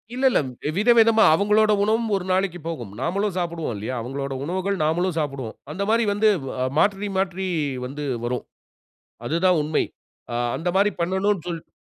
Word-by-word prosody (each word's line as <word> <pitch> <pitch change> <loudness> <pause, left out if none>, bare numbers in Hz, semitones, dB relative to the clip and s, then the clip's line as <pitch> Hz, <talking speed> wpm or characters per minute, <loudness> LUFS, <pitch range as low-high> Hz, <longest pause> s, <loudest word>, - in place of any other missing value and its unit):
இல்ல, 265 - 0
இல்ல - - +3 0.4
வித 210 +6 +1
விதமா 225 -1 +6
அவங்களோட 210 +3 +3
உணவும் 220 +1 +1
ஒரு 185 - -2
நாளைக்கு 185 -2 0
போகும். 120 -12 -5
நாமளும் 195 +7 -1
சாப்புடுவோம் 170 -7 -2
இல்லையா? 110 +5 -4
அவங்களோட 135 +3 -4
உணவுகள் 190 +4 -1
நாமளும் 170 +3 +1
சாப்புடுவோம். 135 -6 -4 0.2
அந்த 195 +5 -3
மாரி 230 +1 +3
வந்து 215 +1 +3 0.2
வ - - -5 0.3
மாற்றி 200 +3 +2
மாற்றி 190 0 -1 0.4
வந்து 145 +3 -6 0.2
வரும். 125 0 -2 0.8
அதுதான் 170 +5 +2
உண்மை. 155 +1 +1 0.5
ஆ - - -2 0.2
அந்த 170 +2 -2
மாரி 205 +1 +3
பண்ணணும் 190 +1 0
சொல் 165 -2 -5
180 Hz, 155 wpm, -23 LUFS, 155-205 Hz, 0.8 s, விதமா